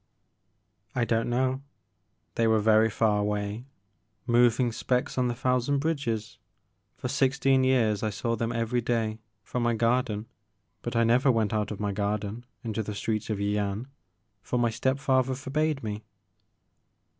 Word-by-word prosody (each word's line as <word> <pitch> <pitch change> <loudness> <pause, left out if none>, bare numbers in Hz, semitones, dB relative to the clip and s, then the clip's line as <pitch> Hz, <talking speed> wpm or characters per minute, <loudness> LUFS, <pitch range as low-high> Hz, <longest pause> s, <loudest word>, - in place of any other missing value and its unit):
" - - -47 0.3
I 120 - +2
don't 115 0 0
know. 130 +2 0 0.7
They 115 - +2
were 110 0 +4
very 110 +1 +4
far 105 -1 +2
away, 105 +2 -2 0.6
moving 120 0 +3
specks 125 +2 -1
on 125 -1 +1
the 120 - -2
thousand 125 +2 +1
bridges. 135 -8 -2 0.6
Poi* - - -4
sixteen 135 0 +2
years 115 -6 +2
I 110 - 0
saw 115 +3 -2
them 115 +1 -2
every 115 +1 0
day 115 -2 -1 0.2
from 125 - -3
my 120 0 +2
gar 120 +3 +3
den 105 -3 -5 0.6
but 120 +1 -4
I 115 - +4
never 125 +4 +4
went 110 -2 +1
out 105 -1 0
of 105 - -6
my 105 -1 -1
garden 105 +3 -3 0.2
into 110 -1 -2
the 105 -1 -5
streets 110 +1 -2
of 110 - -1
Yian, 100 +3 -1 0.5
for 125 - -2
my 120 -1 +2
step 130 +4 0
father 130 -1 +1
forbade 140 +1 -1
me. 105 0 -4
115 Hz, 160 wpm, -27 LUFS, 110-125 Hz, 0.7 s, were